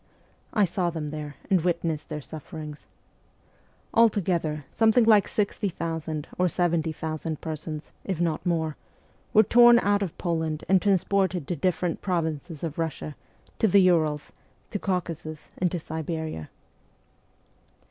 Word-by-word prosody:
I 210 -3 +3
saw 175 0 0
them 160 -3 -4
there, 150 -1 -6 0.2
and 185 -4 +4
witnessed 170 -3 -1
their 150 -1 -4
suffer 155 +2 -9
ings. 150 -1 -8 1.1
Altogether, 175 -9 +2
something 225 +1 +4
like 215 -3 +5
60,000 165 -7 -2
or 180 - +4
70,000 160 -2 -1
persons, 155 -1 -6
if 190 -4 -3
not 165 -3 0
more, 160 -4 0 0.5
were 215 - +7
torn 240 +2 +7
out 205 -3 +2
of 190 -5 -3
Poland 160 -3 -1
and 190 0 +4
transported 190 -4 +1
to 175 - -1
different 175 +1 0
provinces 160 -3 -2
of 160 -1 -4
Russia, 160 -2 -3 0.4
to 220 - +4
the 200 0 +6
Urals, 155 -5 +2 0.4
to 205 - -2
Caucasus, 165 -5 -3
and 180 -2 +1
to 180 - -1
Siberia. 160 - -4
165 Hz, 130 wpm, -26 LUFS, 155-185 Hz, 1.1 s, were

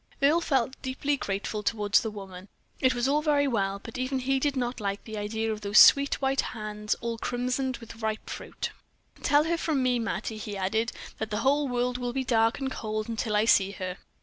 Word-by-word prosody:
Earle 295 +5 +4
felt 265 -4 0
deeply 275 +2 -1
grateful 205 -3 -3
toward 210 -1 -2
the 225 - +5
woman. 195 -2 -9 0.3
It 255 -1 +3
was 240 +1 +1
all 295 +2 +2
very 290 -2 +2
well, 200 -6 0
but 230 +2 -7
even 255 +1 -1
he 265 +1 +1
did 285 +1 0
not 245 -1 -2
like 200 -1 -3
the 220 - -7
idea 220 +2 -2
of 215 -1 -4
those 205 0 +1
sweet 280 0 +7
white 270 0 +2
hands 210 -1 -3
all 230 -1 -3
crimsoned 250 +2 -1
with 230 0 -12
ripe 220 0 -2
fruit. - - -5 0.5
"Tell 290 +1 +4
her 335 +2 0
from 295 -6 0
me, 250 -1 +2
Mattie," 225 -1 -3
he 205 -1 -5
added, 220 +4 0 0.3
"that 220 - -3
the 210 +1 -2
whole 285 +1 +3
world 245 0 -1
will 245 -1 -3
be 265 0 -1
dark 230 -2 +2
and 270 -1 -3
cold 215 -2 -3
until 225 -1 -1
I 210 +1 +3
see 200 -3 +4
her." 185 -1 -5
235 Hz, 210 wpm, -28 LUFS, 210-265 Hz, 0.5 s, sweet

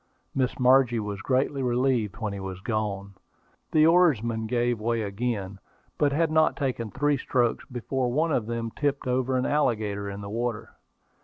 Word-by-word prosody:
Miss 130 -2 0
Margie 125 -2 +4
was 105 -1 -4
greatly 135 +1 0
relieved 125 -4 0
when 110 -3 -3
he 100 - -5
was 95 -1 -6
gone. 100 -2 -3 0.6
The 155 0 +5
oarsmen 120 - +3
gave 120 0 0
way 115 +1 0
again, 100 -2 -3 0.4
but 145 -1 +3
had 160 +2 +1
not 155 0 +3
taken 125 -6 -2
three 145 +3 +1
strokes 125 -3 0
before 125 +1 -2
one 160 +5 +1
of 115 -7 0
them 115 -1 -3
tipped 145 +1 -1
over 130 +1 0
an 125 - 0
alligator 110 -8 0
in 100 +1 -6
the 100 - -7
water. 115 -1 -3
120 Hz, 165 wpm, -26 LUFS, 110-135 Hz, 0.6 s, The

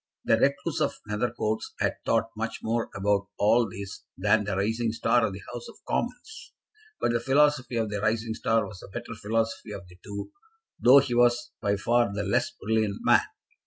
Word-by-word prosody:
The 115 - +5
recluse 140 +4 +1
of 150 - 0
Nethercoats 110 0 -2
had - - 0
thought 115 0 +2
much 115 +1 -4
more 115 +1 -1
about 100 0 +1
all 115 +2 +3
this 100 0 -8
than 105 +2 +3
the 100 -1 -2
rising 110 +3 0
star 115 +1 +2
of - - -5
the 95 +1 -9
House 120 -1 -6
of - - -13
Commons; 250 - -4 0.5
but - - +1
the 120 - +1
philosophy 135 0 +2
of 110 -2 0
the 100 -1 -2
rising 110 +1 0
star 115 -1 +1
was 95 -1 -10
the - - -11
better 100 - -7
philosophy 110 0 -2
of 95 -3 -8
the 90 0 -16
two, 100 0 -6 0.5
though 130 +3 +8
he 140 -3 +3
was 120 0 +3
by 100 -2 +1
far 120 +1 +2
the 100 0 -2
less 100 - +1
brilliant 110 -1 -1
man. - - +6
110 Hz, 190 wpm, -27 LUFS, 105-120 Hz, 0.5 s, though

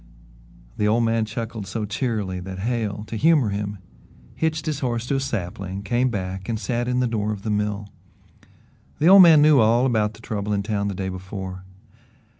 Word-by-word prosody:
The 105 - +1
old 115 +2 +2
man 115 -1 +1
chuckled 110 -2 -5
so 110 +3 -3
cheerily 105 -4 -2
that 95 +1 -7
Hale, 105 -1 -2
to 115 - -7
humour 150 -2 +3
him, 100 0 -3 0.6
hitched 160 -1 -1
his 150 -3 -2
horse 120 -3 -2
to 135 +2 0
a - - 0
sapling, 95 -6 -4
came 120 +5 +1
back 95 -2 -5
and 110 -2 -1
sat 120 +1 -2
in 125 0 +1
the - - +2
door 110 -2 -1
of 100 -2 -6
the 110 - -2
mill. 105 0 -2 1.1
The 150 - 0
old 195 +2 +9
man 160 -4 +8
knew 150 -2 +6
all 115 +3 +4
about 110 -4 +1
the 110 - -16
trouble 105 -1 -3
in 100 -1 0
town 100 -1 -1
the 100 - -3
day 95 0 -3
before. 95 0 -7
110 Hz, 195 wpm, -23 LUFS, 100-120 Hz, 1.1 s, old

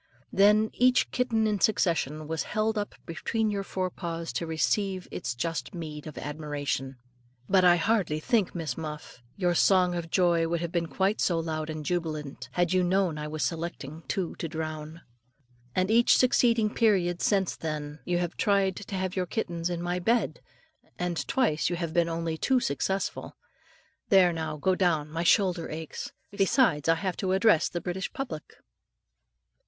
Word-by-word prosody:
Then 210 +2 +5
each 250 0 +3
kitten 230 -3 +1
in 210 -2 +1
succession 165 -7 +1
was 160 0 -2 0.2
held 220 +1 +2
up 205 -1 -3
between 215 +6 -1
your 200 -1 -1
forepaws 170 -5 -4
to 165 +7 -2
receive 185 +3 0
its 120 0 -4
just 165 +6 -3
meed 155 -3 -6
of 155 - -9
admiration. 145 -3 -3 0.5
But 190 -1 +4
I 175 -1 +7
hardly 175 -4 +1
think, 215 +1 +1
Miss 160 -7 -3
Muff, 150 -5 -7 0.2
your 180 -3 +2
song 180 0 +4
of 170 -2 -4
joy 170 -2 +3
would 170 +1 -1
have 170 0 -3
been 170 -1 0
quite 190 +8 0
so 175 - +2
loud 160 -1 -3
and 155 -1 -5
jubilant, 155 -5 -3
had 175 0 +1
you 185 -1 +3
known 180 -3 +1
I 150 - -4
was 155 -1 -3
selecting 160 -1 -4
two 185 -4 -2
to 165 - -3
drown. 155 0 -5 0.7
And 185 +3 +1
each 235 +1 +5
succeeding 230 -3 +3
period 185 -6 +2
since 195 -3 +1
then, 150 -1 -5
you 175 -1 0
have 175 -1 -2
tried 195 -2 +2
to 205 -1 -6
have 185 0 -2
your 185 -2 -1
kittens 170 -4 -2
in 175 -1 -3
my 175 +1 -1
bed, 230 +6 +1 0.6
and 180 -2 -2
twice 195 -14 +1
you 175 - -1
have 170 -2 -3
been 170 -1 +2
only 165 -1 -3
too 260 -1 +3
successful. 190 - -2 0.7
There, 185 -3 +6
now, 160 -2 -3
go 185 +6 +2
down, 165 -5 +1
my 165 +1 -2
shoulder 180 -1 +2
aches; 160 0 -6 0.2
besides, 195 - +2
I 165 - +6
have 180 +2 -3
to 190 -2 0
address 190 -3 +4
the 175 - -3
British 185 +1 -3
public. 260 - -6
175 Hz, 170 wpm, -28 LUFS, 160-195 Hz, 0.7 s, I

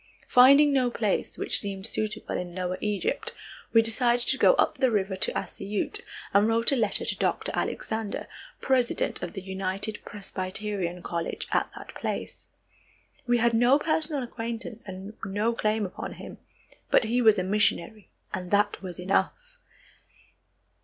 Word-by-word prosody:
Finding 280 +4 +7
no 255 -2 +3
place 215 -4 -1
which - - +1
seemed 195 -1 -4
suitable 215 -1 -2
in 175 -1 -4
lower 185 0 -2
Egypt, 210 -2 -1 0.4
we 225 -1 +6
decided 240 +1 +2
to - - +2
go - - +6
up - - +1
the 260 - +4
river 195 -3 0
to 185 - 0
Assiyut, 205 +1 -3 0.3
and 200 +2 +5
wrote 230 +2 +3
a - - +3
letter 220 -5 0
to - - 0
Dr. - - -1
Alexander, 220 -2 -3 0.3
president 255 -3 +1
of - - -5
the 195 - -5
United 190 +2 -3
Presbyterian 190 -2 -4
College 170 -1 -3
at - - +1
that - - -10
place. - - -5 0.8
We 240 0 +4
had 235 0 +2
no 245 +4 +5
personal 305 -2 0
acquaintance 230 -1 -5
and 190 +2 -7
no 205 +4 0
claim 215 -1 0
upon 185 - -6
him, - - -10 0.5
but - - +5
he 235 +3 +1
was 220 -3 +6
a 185 - 0
missionary, 210 0 0 0.2
and 180 -1 -4
that 205 +1 +2
was 185 -2 -7
enough. 190 +2 +1
215 Hz, 155 wpm, -27 LUFS, 195-235 Hz, 0.8 s, Finding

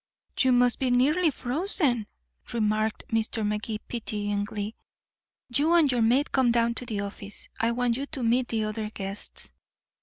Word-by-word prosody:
"You 260 - +5
must 245 -1 +4
be 260 - +1
nearly 295 +8 +3
frozen," 265 - 0 0.5
remarked 215 -1 0
Mr. 225 -1 0
Magee 210 +1 -2
pityingly. 205 -2 -3 0.8
"You 315 +4 +4
and 310 -5 +5
your 245 -2 +1
maid 250 +6 +3
come 260 -3 +3
down 235 0 +2
to 245 +1 -5
the 210 -4 -2
office. 200 0 -7
I 230 - +2
want 240 0 +1
you 280 +1 -4
to 275 -5 -4
meet 240 +2 +2
the 220 -1 -1
other 215 0 -3
guests." 195 -1 -6
235 Hz, 155 wpm, -27 LUFS, 215-255 Hz, 0.8 s, You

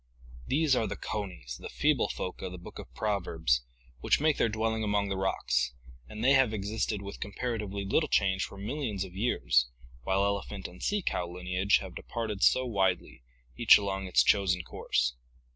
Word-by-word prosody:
These 145 -1 +3
are 115 - +1
the - - -4
conies, 90 - -5
the - - -7
feeble - - +2
folk 90 - -5
of 95 - -4
the 90 - -7
book 85 - -10
of - - -10
Proverbs, 80 - 0 0.4
which - - +2
make 155 0 +2
their 115 - +2
dwelling 110 +1 -1
among 105 -1 +1
the 100 - -1
rocks, 95 -9 0 0.3
and 110 +1 -6
they 130 - +5
have 130 -5 +4
existed 105 0 -2
with 100 - -8
compara 115 +3 -3
tively 100 -1 -4
little 155 +9 +2
change 95 -1 +2
for - - -7
millions 105 -2 -3
of 95 -2 -9
years, - - +2 0.3
while 95 +9 +1
elephant 100 -1 -3
and 90 +1 -14
sea 205 -2 0
cow 90 - -1
lineage 90 +3 +1
have 95 -3 -8
departed 110 -4 -4
so 130 - +4
widely, 95 - 0 0.3
each 120 - +8
along 95 -1 -3
its 90 - +4
chosen 95 -3 +3
course. - - -1
100 Hz, 180 wpm, -30 LUFS, 90-110 Hz, 0.4 s, each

